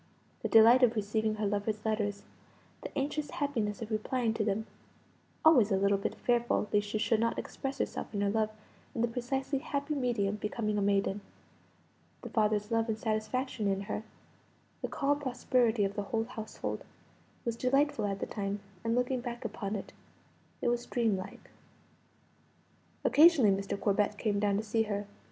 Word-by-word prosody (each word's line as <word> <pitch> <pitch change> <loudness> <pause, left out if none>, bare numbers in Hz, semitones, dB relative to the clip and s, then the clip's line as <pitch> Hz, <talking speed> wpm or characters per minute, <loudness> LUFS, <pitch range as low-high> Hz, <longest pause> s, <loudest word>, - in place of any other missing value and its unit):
The - - -1
delight 230 +3 +7
of 240 -2 +5
receiving 215 +1 0
her 215 0 -2
lover's 205 +1 -1
letters 210 -2 -1 0.6
the - - -5
anxious 295 +2 -1
happiness 235 - -2
of 225 - -8
replying 225 +2 0
to 225 - -1
them 215 +1 -1 0.8
(always 250 -10 +6
a - - +4
little 200 0 +2
bit - - -2
fearful 240 -3 +1
lest 205 0 +2
she 215 - -2
should 225 0 +2
not 230 +1 +1
express 270 0 -4
herself - - -3
and 205 -1 -1
her 200 - +2
love 215 0 +1 0.5
in 230 - -1
the - - +3
precisely 265 +4 -2
happy 285 +2 -2
medium 230 -7 0
becoming 210 0 -1
a - - 0
maiden) 200 0 +1 1.0
the - - -7
father's 210 0 +1
love 225 0 +2
and 215 - 0
satisfaction 220 +1 -1
in 195 0 0
her 205 +1 -3 0.8
the - - -1
calm 285 0 0
prosperity 250 -4 +1
of 195 - -2
the 205 - -2
whole 225 -1 +1
household 225 -2 -5 0.6
was 235 -1 -1
delightful 275 +1 +2
at 200 -1 -1
the - - -2
time, 200 0 -3 0.2
and, 230 0 +1
looking 250 0 0
back 240 0 -6
upon 210 -2 -3
it, 200 - -6 0.7
it - - +3
was 240 0 -1
dreamlike. 215 -6 -2 1.5
Occasionally 300 -9 +7
Mr. 195 0 -3
Corbet 205 +1 +1
came 205 -2 0
down 200 -1 +2
to 215 - -1
see 225 +1 +1
her. 205 -2 -2
220 Hz, 170 wpm, -31 LUFS, 205-245 Hz, 1.5 s, delight